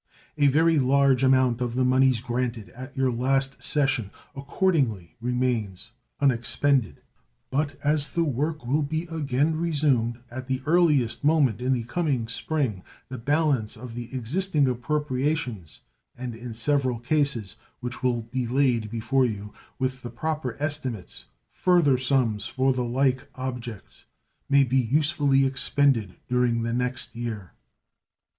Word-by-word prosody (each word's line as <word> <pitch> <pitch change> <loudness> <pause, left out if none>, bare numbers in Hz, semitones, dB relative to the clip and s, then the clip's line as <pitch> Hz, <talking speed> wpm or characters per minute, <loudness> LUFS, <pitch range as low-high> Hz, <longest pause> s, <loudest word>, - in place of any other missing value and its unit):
A 145 -2 +3
very 160 +3 +4
large 135 0 +3
amount 130 -2 +3
of 120 -1 -2
the 130 0 +2
moneys 130 -2 +3
granted 120 -3 -3
at 130 +3 -11
your 130 -1 +2
last 135 +3 0
session 135 -8 +1 0.3
accordingly 135 - 0
remains 120 -5 -2 0.3
unexpended; 135 0 +1 0.5
but 145 +1 0
as 150 0 +2
the 170 - 0
work 150 0 -2
will 140 +6 +1
be 155 +3 -2
again 150 0 0
resumed 145 -8 +1
at 130 +1 -7
the 130 0 -2
earliest 150 -9 +2
moment 145 -8 +3
in 130 +1 0
the 125 -3 +1
coming 130 -2 -1
spring, 120 -4 -2 0.3
the 130 -1 -6
balance 140 -4 0
of 120 +1 -9
the 120 0 -7
existing 145 - 0
appropriations, 130 - -2 0.4
and 125 -1 -5
in 115 0 -8
several 130 0 0
cases 120 - -1 0.2
which 125 0 -6
will 120 -2 0
be 120 +2 -3
laid 125 -4 +1
before 125 +4 +1
you, 105 -2 -6 0.2
with 130 -1 -2
the 120 - -6
proper 130 0 -3
estimates, 140 - -4 0.3
further 170 -8 +3
sums 130 -6 +1
for 130 0 +1
the 125 -1 -1
like 130 +2 0
objects, 125 -5 -7 0.4
may 140 0 +5
be 130 0 +1
usefully 140 +1 +2
expended 130 -6 +2
during 125 -2 +1
the 115 0 -1
next 125 0 -3
year. 110 -6 -5
130 Hz, 135 wpm, -25 LUFS, 120-145 Hz, 0.5 s, may